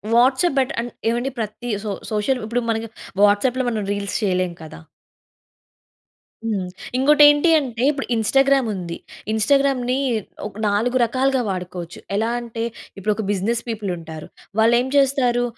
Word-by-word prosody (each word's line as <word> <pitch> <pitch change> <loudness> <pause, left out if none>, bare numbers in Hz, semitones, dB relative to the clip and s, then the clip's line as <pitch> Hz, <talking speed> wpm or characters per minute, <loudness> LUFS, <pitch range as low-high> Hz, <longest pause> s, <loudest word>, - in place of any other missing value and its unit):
WhatsApp 260 +6 +3
బెట 260 - +1
on 240 - -5 0.2
ఏవండీ 240 +3 -1
ప్రతి 225 +3 -4
so 210 - -3 0.2
social 215 +5 0
ఇప్పుడు 240 +2 -1
మనకి 225 0 -1 0.3
వాట్సాప్‌లో 250 +5 +3
మనం 220 -3 -2
రీల్స్ 200 -1 -3
చేయలేం 185 -2 0
కదా! 155 - -10 1.7
హ్మ్. 200 -5 -1 0.3
ఇంకోటి 295 +3 +5
ఏంటి 295 +3 +3
అంటే, 245 -3 -4
ఇప్పుడు 275 -2 -5
ఇన్‌స్టాగ్రామ్ 270 +3 +3
ఉంది. 175 -3 -5 0.4
ఇన్‌స్టాగ్రామ్‌ని 260 +2 +2 0.5
ఒక్ 205 0 -12
4 225 +5 +1
రకాలుగా 260 +2 +1
వాడుకోవచ్చు. 180 -2 -5 0.2
ఎలా 220 +3 +1
అంటే 230 -1 -5 0.3
ఇప్పుడు 210 +2 0
ఒక 220 - -3
బిజినెస్ 220 +4 0
పీపుల్ 215 -3 -3
ఉంటారు. 160 -2 -9 0.3
వాళ్ళు 230 +2 +5
ఏం 255 - -3
చేస్తారు? 260 -3 +3
230 Hz, 140 wpm, -21 LUFS, 205-260 Hz, 1.7 s, ఇంకోటి